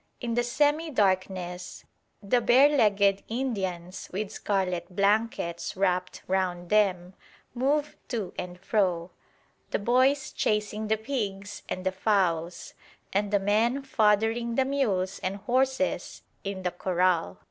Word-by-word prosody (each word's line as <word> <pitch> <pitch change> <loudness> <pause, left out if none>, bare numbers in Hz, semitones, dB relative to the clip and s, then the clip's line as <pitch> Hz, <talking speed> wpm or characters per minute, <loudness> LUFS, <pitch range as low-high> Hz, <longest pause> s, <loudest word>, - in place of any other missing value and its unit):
In 235 -2 -3
the 240 - +2
semi 295 +6 +1
darkness 185 - -1 0.4
the 240 +5 +2
bare 270 +6 +5
legged 200 -4 +3
Indians 190 -8 -3
with 200 +2 -3
scarlet 185 -3 -2
blankets 200 -4 0
wrapped 185 -1 0
round 180 -1 -1
them 190 -4 +2 0.4
move 285 +4 0
to 215 -8 -3
and 180 0 -6
fro; 185 -4 0 0.6
the - - 0
boys 255 +6 +2
chasing 210 0 -1
the 220 +1 +2
pigs 205 -5 -4
and 185 - -4
the 190 - +2
fowls, 180 -4 0 0.4
and 200 +1 +1
the 205 - +3
men 225 +7 +1
foddering 225 -1 +2
the 265 - +3
mules 210 -10 0
and 185 +1 -2
horses 260 +5 -1 0.2
in 195 -1 -4
the 180 - 0
corral. 180 -1 0
205 Hz, 125 wpm, -27 LUFS, 185-240 Hz, 0.6 s, bare